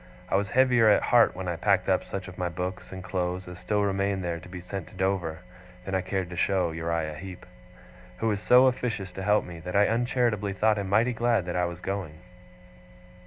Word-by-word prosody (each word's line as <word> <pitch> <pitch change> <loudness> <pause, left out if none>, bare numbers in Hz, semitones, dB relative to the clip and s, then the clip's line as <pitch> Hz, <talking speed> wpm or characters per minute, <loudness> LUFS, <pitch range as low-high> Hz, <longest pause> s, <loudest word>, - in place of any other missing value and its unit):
I - - +1
was 100 +1 +1
heavier 120 -1 +4
at 105 - +4
heart 120 -1 +4
when 95 0 -5
I 85 -2 -2
packed 95 +1 +2
up 95 -1 +2
such 100 -1 -6
of 90 - -9
my 90 -1 -2
books 90 +2 -5
and 95 -1 -7
clothes 90 -1 -3
as 90 0 -9
still 105 +1 0
remained 100 -1 0
there 85 -1 -2
to 90 - -13
be 90 0 -7
sent 90 0 -6
to - - -15
Dover, 90 -4 -1 0.4
than 95 - -5
I 95 - +2
cared 95 -1 -3
to - - -6
show 90 -1 +1
to - - -8
Uriah 80 -1 -2
Heep; 95 +3 -9 0.7
who 115 - -1
was 105 -2 0
so 125 +3 +6
officious 115 -7 -1
to 95 - -7
help 105 +2 +2
me, 85 -1 -9
that 90 +3 -6
I 100 +1 +5
uncharitably 115 -3 0
thought 105 +2 +2
him 100 -1 -4
mighty 115 +5 +3
glad 115 -4 +1
that 90 - -4
I 90 0 +2
was 85 0 -6
going. 95 -6 -4
95 Hz, 225 wpm, -27 LUFS, 90-105 Hz, 0.7 s, so